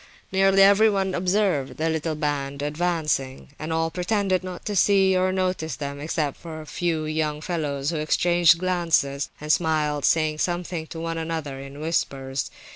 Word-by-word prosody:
Nearly 195 0 +5
everyone 200 -1 +4
observed 180 -9 0
the 160 - 0
little 160 0 -1
band 145 -2 -2
advancing, 150 -4 -1
and 155 +1 -5
all 165 0 0
pretended 185 +1 0
not 185 -1 -7
to 210 - -2
see 195 -1 +4
or 185 0 +2
notice 185 -6 -1
them, 140 +1 -5
except 150 -1 -2
a 155 -2 -7
few 165 -1 -2
young 155 -1 -1
fellows 150 -4 -2
who 165 - -2
exchanged 170 +2 +4
glances 165 -6 0
and 150 0 -1
smiled, 150 -3 0
saying 155 -1 +2
something 175 -2 -2
to 165 - -8
one 165 0 -3
another 160 -4 -4
in 140 +1 -9
whispers. 135 -4 -2
160 Hz, 155 wpm, -24 LUFS, 150-180 Hz, -, Nearly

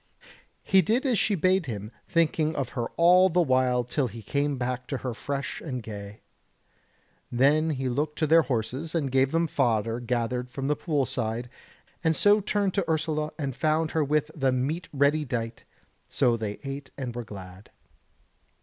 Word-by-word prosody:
He 190 -1 +5
did 230 - +1
as 245 -7 +2
she 205 - +2
bade 185 -1 +2
him, 105 -2 -5 0.2
thinking 160 -1 +1
of 135 -3 -2
her 120 -4 -3
all 180 +2 +6
the 180 +1 +1
while 130 -3 +2
till 130 +2 -1
he 115 -1 -9
came 140 +4 -1
back 125 0 -3
to 135 - -2
her 125 - -1
fresh 140 +4 -4
and 125 -6 -5
gay. 105 -1 -8 1.1
Then 145 +6 +3
he 135 -4 -2
looked 150 +4 -1
to 160 - +1
their 165 +2 +6
horses 130 +5 -3
and 145 -5 0
gave 135 +1 +3
them 165 +1 +2
fodder 115 -6 0
gathered 125 +1 -2
from 135 +2 -5
the 150 - +2
pool 145 -3 0
side, 120 -1 -3 0.5
and 160 -1 +3
so 205 +4 +5
turned 200 -1 0
to 195 -5 -1
Ursula 155 -1 0
and 140 -5 -3
found 155 +3 +1
her 160 - +1
with 150 +1 0
the 135 -3 +1
meat 145 +7 -2
ready 145 +2 +2
dight; 115 -4 -4 0.4
so 125 -4 +2
they 110 -3 -3
ate 135 0 -6
and 125 -4 -5
were 120 - -4
glad. 95 -2 -11
140 Hz, 175 wpm, -27 LUFS, 125-160 Hz, 1.1 s, all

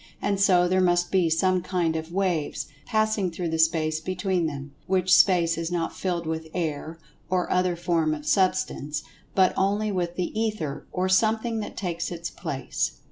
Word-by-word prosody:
And 200 -1 0
so 180 -3 +5
there 185 +1 +2
must 175 -1 +2
be 185 -4 +3
some 185 +3 +2
kind 175 -3 0
of 160 +1 -4
"waves" 180 -5 -1 0.2
passing 215 -3 +1
through 170 0 -4
the 160 0 -2
space 160 -1 +2
between 185 0 -1
them, 140 -1 -6 0.2
which 185 -1 +4
space 170 -4 +4
is 165 +1 -3
not 170 -2 -2
filled 175 -3 -2
with 160 0 -3
"air," 160 -1 -3 0.3
or 180 -1 0
other 180 -1 +2
form 165 -3 +1
of 150 0 -10
Substance, 150 -4 0 0.3
but 185 -1 +4
only 205 +2 +1
with 175 -2 -2
"the 180 - -2
Ether," 215 -10 -2
or 185 +1 0
something 220 +4 +2
that 210 - -6
takes 170 -3 -2
its 170 -1 -5
place. 130 - -3
175 Hz, 175 wpm, -26 LUFS, 160-190 Hz, 0.3 s, so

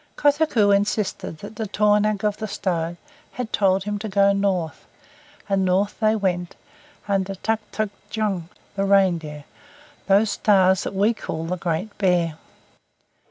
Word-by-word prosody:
Kotuko 290 -8 +3
insisted 200 -4 -1
that 205 +1 -9
the 220 - -3
tornaq 210 0 +2
of 210 -1 0
the 215 - -4
stone 175 -4 -2 0.4
had 245 -3 -5
told 190 -1 +2
him 205 0 -3
to 215 +1 -5
go 200 0 +4
north, 185 -5 -1 0.6
and 195 -1 +1
north 190 +3 +1
they 215 0 +3
went 180 -4 -1 0.5
under 195 -1 0
Tuktuqdjung 215 -3 -3 0.3
the 195 0 0
Reindeer 170 -7 +2 0.6
those 200 +2 +4
stars 190 -3 +3
that - - -4
we 205 +4 +3
call 165 -7 -5
the 180 +2 -2
Great 180 +4 -3
Bear. 175 -5 +1
200 Hz, 135 wpm, -23 LUFS, 185-210 Hz, 0.6 s, go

